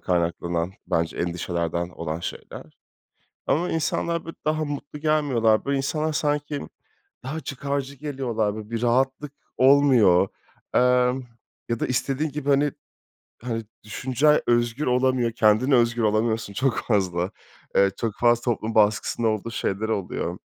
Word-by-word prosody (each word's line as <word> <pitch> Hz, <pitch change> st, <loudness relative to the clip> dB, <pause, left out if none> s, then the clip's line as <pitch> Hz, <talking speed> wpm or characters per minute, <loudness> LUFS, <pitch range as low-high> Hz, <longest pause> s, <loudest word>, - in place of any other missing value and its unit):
kaynaklanan 85 Hz, 0 st, -1 dB
bence 80 Hz, 0 st, -1 dB
endişelerden 85 Hz, 0 st, -2 dB
olan 85 Hz, -2 st, -5 dB
şeyler. -, -, -8 dB, 0.7 s
Ama 175 Hz, +4 st, +1 dB
insanlar, 165 Hz, +1 st, -1 dB
böyle, 165 Hz, -, -8 dB
daha 155 Hz, +1 st, 0 dB
mutlu 145 Hz, 0 st, -6 dB
gelmiyorlar. 140 Hz, -8 st, +2 dB
Böyle, 140 Hz, 0 st, 0 dB
insanlar 155 Hz, +3 st, -1 dB
sanki 145 Hz, -1 st, -1 dB, 0.6 s
daha 150 Hz, +5 st, -4 dB
çıkarcı 140 Hz, -1 st, -4 dB
geliyorlar. 125 Hz, -7 st, -2 dB
Böyle, 110 Hz, -1 st, -8 dB
bir 115 Hz, -1 st, -3 dB
rahatlık 135 Hz, +4 st, +1 dB, 0.2 s
olmuyor. 130 Hz, -9 st, +5 dB, 0.5 s
Emm, 125 Hz, +1 st, +3 dB, 0.5 s
ya 115 Hz, -1 st, -1 dB
da -, -, -1 dB
istediğin 135 Hz, +4 st, -1 dB
gibi, 145 Hz, 0 st, -4 dB
hani, 140 Hz, +1 st, +3 dB, 0.7 s
hani, 115 Hz, -2 st, -3 dB, 0.2 s
düşüncen 130 Hz, +7 st, +2 dB
özgür 120 Hz, +4 st, +1 dB
olamıyor, 125 Hz, -1 st, +2 dB
kendine 110 Hz, +4 st, +3 dB
özgün 120 Hz, -1 st, +2 dB
olamıyorsun 110 Hz, 0 st, 0 dB
çok 130 Hz, +5 st, 0 dB
fazla. 90 Hz, -4 st, 0 dB, 0.4 s
Eee, 100 Hz, 0 st, +5 dB
çok 115 Hz, -3 st, -2 dB
fazla 120 Hz, -1 st, +3 dB
toplum 115 Hz, -2 st, -2 dB
baskısında 110 Hz, +2 st, +2 dB
olduğu 110 Hz, +1 st, -1 dB
şeyler 110 Hz, 0 st, -2 dB
oluyor. 100 Hz, -4 st, -2 dB
120 Hz, 130 wpm, -24 LUFS, 105-140 Hz, 0.7 s, olmuyor